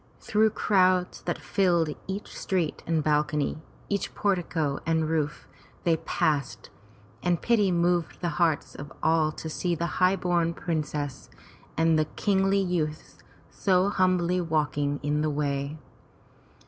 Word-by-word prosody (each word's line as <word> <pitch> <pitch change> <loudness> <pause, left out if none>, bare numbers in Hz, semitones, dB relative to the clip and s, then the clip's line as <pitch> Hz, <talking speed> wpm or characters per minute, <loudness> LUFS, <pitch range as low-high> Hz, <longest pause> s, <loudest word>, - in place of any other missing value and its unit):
Through 220 +1 +2
crowds 185 -4 +2
that 175 - -1
filled 170 -5 +1
each 195 +2 -5
street 175 -5 -1
and 160 -2 +1
bal 150 0 +3
cony, 150 +1 -2 0.3
each 200 -1 -2
portico 170 -7 0
and 160 -1 +1
roof, 155 -2 -2 0.4
they 165 -2 +3
passed, 140 -9 -1 0.5
and 175 -2 +1
pity 220 -5 +2
moved 175 -1 +1
the 175 - -1
hearts 160 -4 +1
of 140 0 -9
all 160 -1 +3
to 160 - -7
see 170 +2 -1
the 170 +2 -3
highborn 175 -2 +2
princess 150 -4 -3 0.5
and 165 -1 +3
the 155 - +2
kingly 195 -1 +2
youths 165 -5 -2 0.3
so 190 0 +2
humbly 185 -2 +2
walking 145 -3 0
in 150 +1 0
the 155 - +1
way. 145 0 -2
165 Hz, 135 wpm, -27 LUFS, 150-185 Hz, 0.5 s, bal